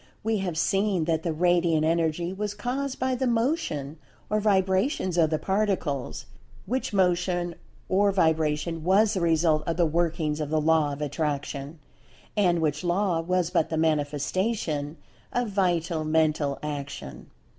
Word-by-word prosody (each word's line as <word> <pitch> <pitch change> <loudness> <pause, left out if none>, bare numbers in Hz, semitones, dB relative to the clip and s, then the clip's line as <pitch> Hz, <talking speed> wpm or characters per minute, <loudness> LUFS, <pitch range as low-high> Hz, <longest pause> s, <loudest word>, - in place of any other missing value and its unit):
We 220 -1 0
have 180 -4 -3
seen 195 -1 +1
that 160 -1 0
the 165 - -1
Radiant 170 -1 +2
Energy 165 +2 0
was 205 +1 -3
caused 255 +5 -3
by 260 0 0
the 255 +1 0
Motion 225 - -1 0.3
or 215 - +2
Vibrations 190 - +1
of 165 -3 +3
the 155 - +1
Particles, 190 -8 -1 0.4
which 255 +6 -2
Motion 180 -2 +1 0.3
or 200 +2 +3
Vibration 160 -2 +1
was 200 +5 +4
the 190 - -1
result 160 -2 +3
of 165 - -1
the 175 - +4
workings 160 -2 0
of 150 -2 -3
the 155 0 +1
Law 155 -1 +3
of 140 +1 -4
Attraction, 145 0 -3 0.6
and 175 -5 +2
which 150 0 -1
Law 175 0 +1
was 180 0 0
but 170 -4 +1
the 160 - -2
manifestation 155 +1 -1 0.4
of 245 -2 0
Vital 175 -5 0
Mental 155 -2 +1
Action. 140 - -6
170 Hz, 145 wpm, -26 LUFS, 155-195 Hz, 0.6 s, was